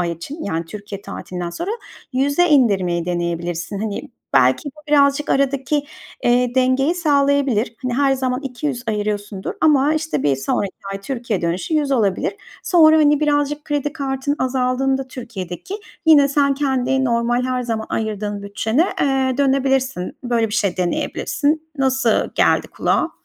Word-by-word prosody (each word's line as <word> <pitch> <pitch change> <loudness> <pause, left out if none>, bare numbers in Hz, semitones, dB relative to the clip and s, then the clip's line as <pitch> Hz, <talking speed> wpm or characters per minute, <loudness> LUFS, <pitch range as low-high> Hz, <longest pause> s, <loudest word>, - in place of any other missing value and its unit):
ay 170 -1 0
için 275 - -8
yani 165 -3 -2
Türkiye 200 +2 -8
tatilinden 180 -3 -6
sonra 260 - -4 0.4
100'e 285 +7 +2
indirmeyi 190 - +3
deneyebilirsin. 175 +1 -3
Hani, 210 +1 -4 0.2
belki 130 - +3
bu 300 - -13
birazcık 285 0 +3
aradaki, 275 +1 +1 0.4
eee, 245 0 +2
dengeyi 260 +5 +2
sağlayabilir. 280 -8 +1
Hani, 250 -2 -1
her 275 +1 +3
zaman 255 -1 -1
200 260 -1 -3
ayırıyorsundur 205 -2 -3
ama, 300 -1 +4
işte, 315 +1 -2
bir 140 -2 +2
sonraki 185 +8 -1 0.2
ay 195 - -5
Türkiye 235 -5 -3
dönüşü 175 - -1
100 295 -2 +1
olabilir. 215 - 0 0.3
Sonra, 315 -3 +6
hani, 295 -1 +4
birazcık 295 0 0
kredi 295 -1 -1
kartın 275 -1 -2
azaldığında 260 +1 0
Türkiye'deki 230 - -7 0.3
yine 290 -3 +7
sen 280 0 +2
kendi 265 -1 0
normal 240 0 +1
her 255 -1 -1
zaman 225 -2 -3
ayırdığın 210 -2 -3
bütçene, 220 +8 0 0.2
eee, 265 -2 +1
dönebilirsin. 265 -7 +1
Böyle 230 -2 +1
bir 210 - -4
şey 200 -4 0
deneyebilirsin. 295 - -1
Nasıl 260 -4 +2
geldi - - +2
kulağa? - - 0
255 Hz, 140 wpm, -20 LUFS, 205-280 Hz, 0.4 s, yine